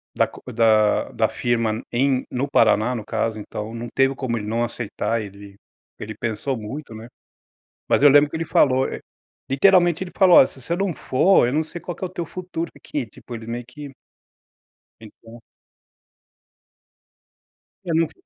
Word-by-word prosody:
da - - +3
co - - -14
da 110 -2 +3
da - - +1
firma 115 -2 -1
em 130 +1 +1
no 135 +3 -2
Paraná, 115 0 +3
no 110 - -6
caso, 110 0 -2
então 105 +1 -6
não 120 +1 -6
teve 135 0 +3
como 125 -3 -2
ele 105 -2 -5
não 115 +2 0
aceitar 115 -1 -3
ele 100 0 -11 0.4
ele 110 +1 -6
pensou 120 +4 -3
muito, 115 +3 -7
né. 110 +2 -10 0.8
Mas - - +2
eu 145 - +9
lembro 145 +1 +6
que 160 - -7
ele 165 0 -2
falou, 130 -3 +3
e - - -5 0.5
literalmente 175 +4 +4
ele 180 - -10
falou: 185 -3 +7
"Olha, - - +8
se 130 - -16
você 170 +7 -2
não 195 +1 -1
for, 155 +3 +3
eu 125 - -2
não 155 +2 +1
sei 160 +2 -9
qual 175 0 -6
que - - -10
é 185 - 0
o - - -15
teu 175 -2 -5
futuro 170 -1 -5
aqui.", 145 -4 -5
tipo 115 +3 -13
ele 115 0 -9
meio 120 +1 -4
que 145 +2 -10 1.1
Então. 115 +1 -14 2.4
Eu 165 -3 -2
não 165 0 +3
fa - - -17
125 Hz, 180 wpm, -22 LUFS, 115-155 Hz, 2.4 s, eu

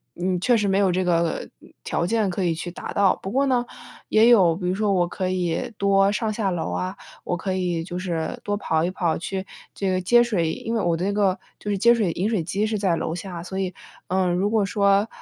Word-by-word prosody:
嗯， 185 +1 -1
嗯， - - -2
确 245 +3 +3
实 210 -2 0
没 195 - +2
有 195 -2 +3
这 185 +1 0
个 170 -2 0 0.4
条 170 - -1
件 215 0 +1
可 185 +1 -2
以 170 - +1
去 175 - -5
达 - - -7
到。 200 -2 +3
不 195 - -4
过 275 +2 +2
呢， 250 -3 +1 0.4
也 220 +2 +5
有 190 -8 +6
比 180 -1 -3
如 180 - +1
说 210 0 +1
我 175 -2 +2
可 185 +1 -3
以 180 -1 -1
多 195 0 +3
上 215 0 -1
下 210 -3 -1
楼 165 - -2
啊， 90 +1 -2 0.3
我 175 - -2
可 190 +1 -3
以 175 -3 -1
就 175 0 -5
是 170 -3 -3
多 205 0 -1
跑 160 -5 0
一 175 - +1
跑 175 -3 0
去 190 +2 -4 0.3
这 195 - -1
个 185 0 0
接 240 +7 +5
水， 175 -9 0
因 230 - -5
为 225 - +1
我 170 -1 +1
的 180 - -2
那 200 - 0
个 195 -2 +1 0.2
就 210 - -6
是 200 - 0
接 235 +5 +5
水 210 -7 +1
饮 200 +5 -1
水 200 -8 0
机 195 +5 -1
是 215 - -1
在 190 -4 +2
楼 160 - -2
下。 175 -1 -6
所 190 +1 -6
以， 185 -2 -2 0.3
嗯， 185 -1 +1
如 190 +4 +1
果 215 -2 +2
说， 200 +1 +2
190 Hz, 270 characters per minute, -23 LUFS, 175-205 Hz, 0.4 s, 有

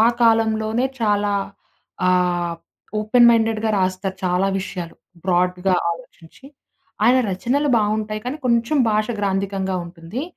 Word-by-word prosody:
ఆ - - +6 0.2
కాలంలోనే 225 +1 +2 0.2
చాలా 205 -2 +1 0.8
ఆహ్, 175 -1 +1 0.5
ఓపెన్ 235 +3 +4
మైండెడ్‌గా 225 -1 +1
రాస్తారు 185 +1 -1
చాలా 180 +2 +1
విషయాలు. 180 -3 -6 0.3
బ్రాడ్‌గా 180 +1 +1 0.2
ఆలోచించి. 170 +6 -11 0.6
ఆయన 250 +2 +5
రచనలు 265 +10 0
బావుంటాయి. 215 0 -1
కానీ, 260 +4 -3
కొంచెం 235 +5 +1
భాష 215 0 +1
గ్రాంథికంగా 195 -1 -1
ఉంటుంది. 170 - -7
205 Hz, 110 wpm, -21 LUFS, 185-225 Hz, 0.8 s, ఆ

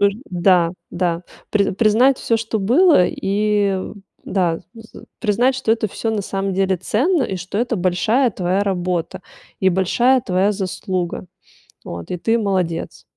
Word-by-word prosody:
Ыр 200 0 +4 0.2
да, 175 -1 +3 0.2
да. 175 -1 -1 0.3
При 200 -2 +2
признать 235 +6 +3
всё, 230 - +1
что 225 0 -2
было 285 - +5
и, 205 0 0 0.5
да, 175 -4 0 0.2
з 225 -1 -13
з - - -15 0.2
признать, 245 +4 +2
что 225 -4 +1
это 220 -2 -1
всё 225 +3 -3
на 205 -2 -1
самом 195 0 -3
деле 190 0 +1
ценно, 265 - +1
и 190 - -3
что 185 +4 -5
это 240 0 0
большая 200 +8 +1
твоя 185 0 -1
работа 180 -1 -2 0.4
и 190 - +4
большая 235 +8 +2
твоя 190 -1 +1
заслуга. 185 -2 -3 0.6
Вот. 85 - -7
И 180 - -2
ты- 225 +7 +1
молодец! 185 -5 -2
195 Hz, 155 wpm, -20 LUFS, 180-225 Hz, 0.6 s, было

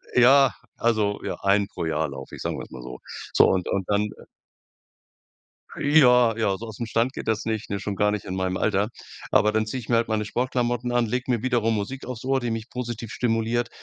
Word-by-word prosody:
ja, 130 +1 +6 0.2
also, 110 -3 +1
ja, - - -3
einen 100 +1 +3
pro - - -5
Jahr 80 -1 0
lauf 70 - -8
ich, - - -9
sagen - - -3
wir's - - -8
mal 65 - -8
so. 60 0 -8 0.3
So - - +7
und 95 -1 0
und 100 - 0
dann 105 +1 +1 1.7
Ja, 125 -6 +5
ja, 105 -4 +1
so 115 - -8
ausm 110 +2 -5
Stand 115 +3 0
geht - - -7
das 110 -1 0
nicht, 110 -2 -3
ne? 100 - -1
Schon 100 0 -4
gar 105 +2 +2
nicht 105 -2 -3
in 95 - -4
meinem 95 -1 -1
Alter. 105 0 +1 0.4
Aber 105 - +4
dann 110 0 +1
ziehe 120 +4 -4
ich 115 - -11
mir 120 - +3
halt 115 0 +2
meine 110 -1 0
Sportklamotten 120 +1 -1
an, 120 -1 +2
lege 125 +3 -1
mir 120 -3 0
wiederum 120 -3 +1
Musik 110 +6 -4
aufs 125 -3 -6
Ohr, 135 0 +2
die 120 -2 -2
mich 115 +1 -4
positiv 120 -3 -5
stimuliert 115 +1 0
115 Hz, 215 wpm, -25 LUFS, 105-120 Hz, 1.7 s, So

